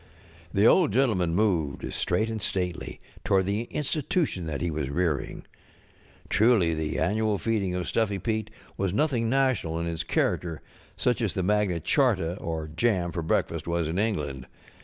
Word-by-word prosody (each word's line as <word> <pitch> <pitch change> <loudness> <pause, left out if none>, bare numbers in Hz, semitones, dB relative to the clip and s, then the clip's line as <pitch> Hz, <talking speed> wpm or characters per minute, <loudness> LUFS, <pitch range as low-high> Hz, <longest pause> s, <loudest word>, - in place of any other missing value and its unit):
The 100 +2 +3
Old 165 +5 +5
Gentleman 95 -10 +2
moved, 85 -9 0
straight 90 +6 0
and 110 -1 -4
stately, 90 -3 -3 0.2
toward 95 -1 +2
the 105 +4 -1
Institution 150 - -1
that 75 -3 -3
he 85 -1 -1
was 75 -3 -2
rearing. 80 -1 -1 0.8
Truly, 105 -7 +3
the 80 -1 -2
annual 105 +5 +1
feeling 100 -4 -1
of 90 -1 -3
Stuffy 105 -3 0
Pete 110 +2 -2 0.3
was 95 -1 -1
nothing 125 -6 +1
national 130 -11 +1
in 85 - -2
its 85 -1 -2
character, 85 -1 -1 0.3
such 125 0 +1
as 110 -5 -1
the 95 - 0
Magna 100 -3 +1
Charts 85 +3 +1
or 80 -2 -4
jam 90 -4 +1
for 85 - -3
breakfast 80 0 -1
was 85 -1 0
in 85 +4 -1
England. 75 - -2
95 Hz, 160 wpm, -27 LUFS, 85-110 Hz, 0.8 s, Old